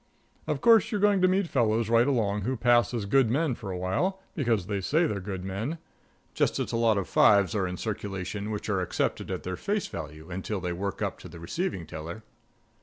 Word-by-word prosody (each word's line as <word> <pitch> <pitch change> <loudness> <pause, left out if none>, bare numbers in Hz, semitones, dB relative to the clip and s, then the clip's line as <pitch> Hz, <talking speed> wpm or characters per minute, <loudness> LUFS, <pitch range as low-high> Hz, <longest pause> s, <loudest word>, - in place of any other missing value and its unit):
Of - - -1
course, 230 -3 +5
you're 210 - 0
going 205 -1 +3
to 185 - +5
meet 185 0 +2
fellows 115 -5 +1
right 115 +2 +4
along 105 -7 +1
who 125 +6 -2
pass 120 0 +4
as 115 -5 -2
good 125 +3 +3
men 145 +3 +1
for 110 -4 -7
a 90 - -3
while, 135 - -1
because 115 - 0
they 100 0 -2
say 155 - +2
they're 105 -10 -1
good 95 -1 -5
men; 105 - -3 0.6
just - - +1
as - - -2
a - - -2
lot 115 -2 +3
of 100 - -2
fives 100 -4 +4
are 95 -3 0
in 90 0 -5
circulation 100 -1 -4
which 105 -1 -4
are 100 -3 0
accepted 90 - -2
at - - -4
their 90 0 -3
face 205 - -1
value 80 +2 -8
until 95 +3 -3
they 90 -1 -3
work 100 +3 -3
up - - -3
to - - -10
the 85 - -11
receiving 95 - -3
teller. 85 +7 -7
105 Hz, 220 wpm, -28 LUFS, 95-130 Hz, 0.6 s, course